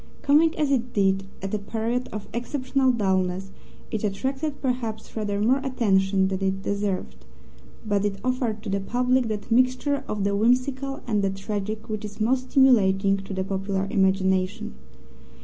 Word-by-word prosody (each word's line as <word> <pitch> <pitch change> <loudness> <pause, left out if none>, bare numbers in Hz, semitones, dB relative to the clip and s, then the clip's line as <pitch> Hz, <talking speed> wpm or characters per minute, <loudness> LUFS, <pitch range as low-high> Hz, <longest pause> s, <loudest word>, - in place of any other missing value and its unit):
Coming 310 +3 +4
as 295 -2 +1
it 245 -2 0
did 195 -1 +2 0.2
at 195 - -4
a 210 - 0
period 230 +4 -2
of 210 -1 -6
exceptional 260 +2 0
dullness, 190 -3 0 0.4
it 220 - -2
attracted 270 +8 -2
perhaps 235 -5 -3
rather 205 -2 -1
more 245 +6 +3
attention 195 -7 +2
than 190 0 -3
it 195 0 -1
deserved, 195 - -3 0.6
but 205 -2 +1
it 205 -1 -1
offered 245 -4 -1
to 215 - -5
the 200 - +1
public 250 +4 +1
that 215 0 -5
mixture 255 +4 +2
of 210 -2 -2
the 200 0 +1
whimsical 255 +5 +1
and 215 -4 +1
the 195 - +1
tragic 210 +3 -4
which 215 -1 -4
is 210 0 -8
most 255 +4 +1
stimulating 195 -7 +4
to 195 +1 -8
the 190 -1 -1
popular 195 0 -2
imagination. 190 - +1
215 Hz, 160 wpm, -25 LUFS, 195-250 Hz, 0.6 s, Coming